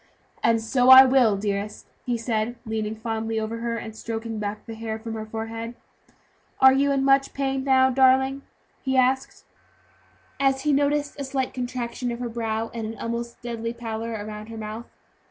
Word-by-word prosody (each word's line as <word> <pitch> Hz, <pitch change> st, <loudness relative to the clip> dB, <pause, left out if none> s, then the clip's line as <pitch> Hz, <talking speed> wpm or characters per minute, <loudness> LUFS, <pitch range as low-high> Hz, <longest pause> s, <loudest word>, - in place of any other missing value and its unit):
"And 230 Hz, 0 st, +3 dB
so 245 Hz, +3 st, +2 dB
I 260 Hz, 0 st, +11 dB
will, 250 Hz, -6 st, +4 dB
dearest," 205 Hz, +1 st, -3 dB, 0.2 s
he 240 Hz, -1 st, 0 dB
said, 230 Hz, 0 st, -1 dB
leaning 220 Hz, -1 st, -3 dB
fondly 225 Hz, 0 st, -3 dB
over 220 Hz, +1 st, -4 dB
her, 230 Hz, 0 st, -2 dB
and 220 Hz, -1 st, -7 dB
stroking 225 Hz, 0 st, -5 dB
back 210 Hz, 0 st, -4 dB
the 225 Hz, -, -7 dB
hair 220 Hz, 0 st, -4 dB
from 225 Hz, 0 st, -7 dB
her 220 Hz, -1 st, -5 dB
forehead. 225 Hz, +1 st, -5 dB, 0.8 s
"Are 265 Hz, 0 st, +8 dB
you 280 Hz, +1 st, +2 dB
in 270 Hz, -1 st, +1 dB
much 275 Hz, 0 st, +3 dB
pain 270 Hz, -1 st, -1 dB
now, 260 Hz, -1 st, +4 dB
darling?" 265 Hz, +1 st, +3 dB, 0.4 s
he 265 Hz, -1 st, 0 dB
asked, 260 Hz, +1 st, +1 dB, 0.9 s
as 270 Hz, -1 st, +2 dB
he 300 Hz, -1 st, +2 dB
noticed 290 Hz, +1 st, 0 dB
a -, -, -2 dB
slight 265 Hz, -1 st, -2 dB
contraction 245 Hz, -1 st, -3 dB
of 235 Hz, -, -4 dB
her 240 Hz, 0 st, -4 dB
brow, 225 Hz, -1 st, -3 dB
and 225 Hz, -2 st, -4 dB
an 225 Hz, 0 st, -7 dB
almost 235 Hz, +2 st, -5 dB
deadly 230 Hz, -1 st, -4 dB
pallor 230 Hz, -1 st, -5 dB
around 210 Hz, 0 st, -6 dB
her 225 Hz, 0 st, -8 dB
mouth. 220 Hz, +2 st, -6 dB
235 Hz, 175 wpm, -24 LUFS, 220-265 Hz, 0.9 s, I